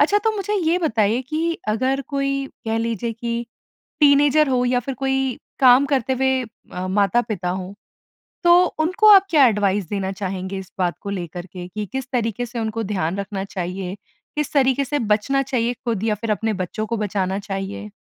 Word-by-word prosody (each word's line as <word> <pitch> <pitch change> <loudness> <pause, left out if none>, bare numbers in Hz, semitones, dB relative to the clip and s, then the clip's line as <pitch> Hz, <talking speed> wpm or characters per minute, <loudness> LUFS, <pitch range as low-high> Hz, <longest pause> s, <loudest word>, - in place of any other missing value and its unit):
अच्छा 360 +8 +4
तो 445 - +4
मुझे 410 +1 -2
ये 350 -3 +2
बताइए 230 - +1
कि 320 +5 -2
अगर 260 +5 +1
कोई, 275 -1 -1 0.2
कह 225 0 0
लीजिए 230 0 -2
कि 235 +1 -4 0.5
टीनएजर 290 +1 +5
हो 250 -1 +2
या 250 0 +2
फिर 265 +2 -5
कोई 265 -1 0 0.2
काम 260 +1 +7
करते 265 -2 0
हुए 265 0 +1 0.3
अ, 185 +1 -4
माता-पिता 200 -1 +1
हों, 185 +1 -4 0.7
तो 350 +1 +6
उनको 370 +7 +3
आप 390 -1 +7
क्या 295 -5 +6
एडवाइस 205 -4 +1
देना 195 -2 -2
चाहेंगे 190 0 -4
इस 190 -1 -8
बात 175 -2 0
को 200 - -6
लेकर 175 -2 -5
के 180 0 -8
कि 210 +3 -5
किस 265 -1 -4
तरीके 235 -1 -1
से 240 0 -6
उनको 225 0 -2
ध्यान 185 -2 -1
रखना 200 -1 -4
चाहिए, 185 0 -4 0.4
किस 300 -2 -2
तरीके 270 -1 +3
से 290 +2 -1
बचना 220 +5 +1
चाहिए 245 -3 0
खुद 225 -4 -1
या 220 -1 +1
फिर 215 +1 -3
अपने 220 +1 0
बच्चों 190 +3 -3
को 230 +2 -2
बचाना 195 -2 -1
चाहिए? 195 +1 -5
230 Hz, 185 wpm, -22 LUFS, 195-270 Hz, 0.7 s, काम